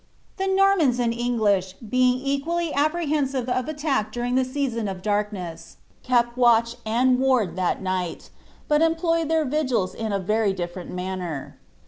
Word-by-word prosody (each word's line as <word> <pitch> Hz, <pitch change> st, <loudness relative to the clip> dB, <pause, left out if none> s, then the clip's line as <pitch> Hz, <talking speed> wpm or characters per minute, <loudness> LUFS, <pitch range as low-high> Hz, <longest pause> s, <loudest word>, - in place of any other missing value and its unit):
The 385 Hz, -, -1 dB
Nornnns 385 Hz, -9 st, +3 dB
and 235 Hz, -1 st, +1 dB
English 215 Hz, -6 st, 0 dB
being 250 Hz, +4 st, +1 dB
equally 300 Hz, +4 st, -1 dB
apprehensive 290 Hz, -4 st, 0 dB
of 255 Hz, +2 st, -1 dB
attack 295 Hz, -7 st, -1 dB
during 245 Hz, 0 st, -2 dB
the 260 Hz, +1 st, +3 dB
season 255 Hz, -4 st, -2 dB
of 185 Hz, -2 st, -6 dB
daikness, 205 Hz, -5 st, -3 dB, 0.2 s
kept 240 Hz, -1 st, +1 dB
watch 235 Hz, -1 st, +3 dB
and 250 Hz, +3 st, +3 dB
wanl 255 Hz, -9 st, +2 dB
timi 185 Hz, +1 st, -1 dB
night, 185 Hz, -2 st, -3 dB, 0.4 s
but 300 Hz, 0 st, +3 dB
employed 330 Hz, 0 st, +1 dB
their 320 Hz, -1 st, +2 dB
vigils 255 Hz, -9 st, 0 dB
in 220 Hz, -1 st, -4 dB
a 200 Hz, -, +1 dB
very 205 Hz, +1 st, 0 dB
difleient 175 Hz, 0 st, -5 dB
manner. 180 Hz, -5 st, -5 dB
245 Hz, 145 wpm, -24 LUFS, 200-285 Hz, 0.4 s, Nornnns